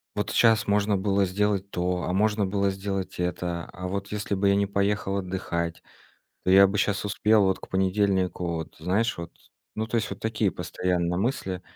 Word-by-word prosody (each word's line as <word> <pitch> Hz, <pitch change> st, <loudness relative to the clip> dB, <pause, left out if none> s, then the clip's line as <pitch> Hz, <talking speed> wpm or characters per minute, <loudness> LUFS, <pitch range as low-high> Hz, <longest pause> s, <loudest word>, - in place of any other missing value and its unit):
вот -, -, -2 dB
щас 110 Hz, -2 st, +4 dB
можно 100 Hz, 0 st, +2 dB
было 100 Hz, 0 st, +2 dB
сделать 100 Hz, +1 st, 0 dB
то, 90 Hz, 0 st, -1 dB
а, 90 Hz, -, -2 dB
можно 105 Hz, +1 st, +2 dB
было 100 Hz, +1 st, +1 dB
сделать 95 Hz, -1 st, -4 dB
это. 90 Hz, -1 st, -2 dB
А 90 Hz, 0 st, -5 dB
вот 100 Hz, +1 st, -4 dB
если 105 Hz, -1 st, -2 dB
бы 100 Hz, +1 st, +2 dB
я 100 Hz, -, +4 dB
не 100 Hz, 0 st, +1 dB
поехал 100 Hz, 0 st, 0 dB
отдыхать, 90 Hz, -3 st, -3 dB, 0.6 s
то -, -, -1 dB
я 95 Hz, +1 st, +8 dB
бы 100 Hz, +1 st, 0 dB
щас 100 Hz, 0 st, 0 dB
успел 105 Hz, +1 st, +3 dB
вот 95 Hz, -1 st, +1 dB
к -, -, -11 dB
понедельнику 95 Hz, -2 st, +1 dB
вот, 80 Hz, -1 st, -6 dB
знаешь, 100 Hz, +8 st, 0 dB
вот. 85 Hz, 0 st, -7 dB, 0.4 s
Ну, 110 Hz, -, -1 dB
то 115 Hz, -, -3 dB
есть 110 Hz, -, -1 dB
вот 100 Hz, -, -6 dB
такие 110 Hz, -3 st, 0 dB
постоянно 90 Hz, -1 st, -1 dB
мысли. 95 Hz, -4 st, -2 dB
100 Hz, 190 wpm, -26 LUFS, 90-105 Hz, 0.6 s, я